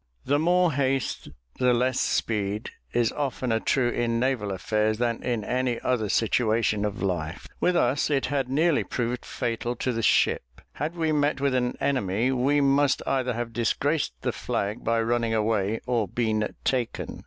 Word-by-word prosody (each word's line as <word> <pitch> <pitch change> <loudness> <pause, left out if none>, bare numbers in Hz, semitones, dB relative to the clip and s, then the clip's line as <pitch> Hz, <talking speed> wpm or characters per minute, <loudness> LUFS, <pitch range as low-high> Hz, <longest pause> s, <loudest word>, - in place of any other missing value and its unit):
"The 145 +2 +2
more 175 0 +3
haste 135 -1 -1 0.3
the 125 -1 +4
less 130 +1 +1
speed," 105 -1 -1 0.2
is 120 -1 +2
oftener 130 -5 -1
true 125 +1 +1
in 115 -1 0
naval 120 -5 0
affairs 105 +3 0
than 120 -1 -1
in 120 -4 -1
any 125 +1 -1
other 115 -5 0
situation 110 -2 +1
of 105 -1 -3
life. 90 -2 -2
With 180 - +2
us 135 0 +2
it 140 -2 +1
had 135 -2 -1
nearly 155 +3 +2
proved 120 0 -3
fatal 120 +1 -3
to 125 +1 -1
the 115 - -2
ship. - - +1
Had 155 +4 -3
we 160 -2 0
met 145 -1 +1
with 140 -1 +1
an 125 -1 0
enemy, 115 -2 +1
we 135 +3 +2
must 140 0 +3
either 130 -2 0
have 120 0 -4
disgraced 135 - 0
the - - 0
flag 105 +4 -3
by 115 0 +1
running 115 -1 0
away, 110 -1 0
or 120 -4 0
been 110 0 -1
taken. 125 -3 -2
120 Hz, 165 wpm, -26 LUFS, 110-135 Hz, 0.3 s, the